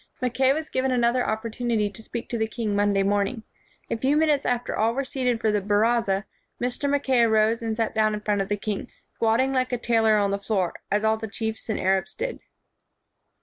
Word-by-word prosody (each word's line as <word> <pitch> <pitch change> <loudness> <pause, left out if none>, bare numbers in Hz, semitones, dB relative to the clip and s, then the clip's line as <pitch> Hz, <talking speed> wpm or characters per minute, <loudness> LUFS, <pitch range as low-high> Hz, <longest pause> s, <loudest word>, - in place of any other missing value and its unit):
Mackay 260 +1 +2
was 310 +3 -2
given 260 +1 0
another 245 0 +2
opportunity 220 0 -1
to 205 +2 -9
speak 235 +1 -6
to 235 - -2
the 220 - +1
king 220 -2 -3
Monday 200 -1 +2
morning. 205 +4 0 0.5
A - - +2
few 270 +6 +2
minutes 305 -3 +2
after 245 0 -1
all 225 +2 +1
were 275 0 -1
seated 250 -3 -1
for 220 -1 +1
the 210 -1 +1
~baraza, 205 0 +1 0.3
Mr. 250 +3 -1
Mackay 270 -3 +2
arose 220 0 +3
and 225 -1 -2
sat 225 -1 -1
down 215 -1 +2
in 210 - -6
front 210 -1 0
of 195 - -4
the 205 - 0
king, 205 0 -4 0.3
squatting 235 +4 +1
like 255 -1 0
a 245 - 0
tailor 225 -2 +3
on 200 -1 +1
the 200 - -1
floor, 195 -4 -1 0.2
as 205 +1 +1
all 220 0 +3
the 220 0 -5
chiefs 220 +2 -4
and 220 - -1
Arabs 190 0 0
did. - - -4
225 Hz, 210 wpm, -25 LUFS, 210-245 Hz, 0.5 s, arose